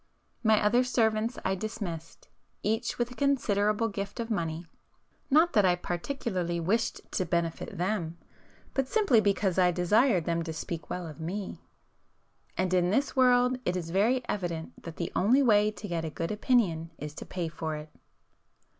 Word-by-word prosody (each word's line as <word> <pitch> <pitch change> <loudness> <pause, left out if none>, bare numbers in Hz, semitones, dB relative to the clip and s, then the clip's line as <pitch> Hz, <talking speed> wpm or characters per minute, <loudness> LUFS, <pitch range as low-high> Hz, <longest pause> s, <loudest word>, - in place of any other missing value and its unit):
My 220 -1 +5
other 240 +5 +3
servants 225 -2 +1
I 190 - +2
dismissed, 190 -6 -6 0.4
each 225 +3 -1
with 240 0 -1
a - - -9
considerable 225 -6 +1
gift 200 +2 -5
of 230 0 -3
money, 165 -4 -2 0.6
not 320 +5 +4
that 210 - +5
I 180 -2 +4
particularly 180 -1 -3
wished 220 +8 0
to 185 - 0
benefit 170 -1 -2
them, 175 -2 -1 0.6
but 270 -1 0
simply 400 - +4
because 195 -2 +1
I 180 -1 +5
desired 180 - +3
them 170 0 0
to 165 -1 -4
speak 160 +1 -6
well 180 -1 -4
of 155 -1 -9
me. 190 +5 -5 1.0
And 185 -1 0
in 180 -1 +3
this 275 +8 +1
world 250 -1 +4
it 180 - 0
is 165 -2 -5
very 225 +8 +2
evident 170 -5 -4
that 165 -1 -8
the 170 - -3
only 250 +9 +4
way 210 -3 +5
to 215 0 -8
get 170 -3 -2
a 160 - -2
good 165 +4 -4
opinion 210 -8 +1
is 150 0 -6
to - - -7
pay 175 -3 -3
for 160 -1 -4
it! 150 0 -8
200 Hz, 170 wpm, -29 LUFS, 170-230 Hz, 1.0 s, My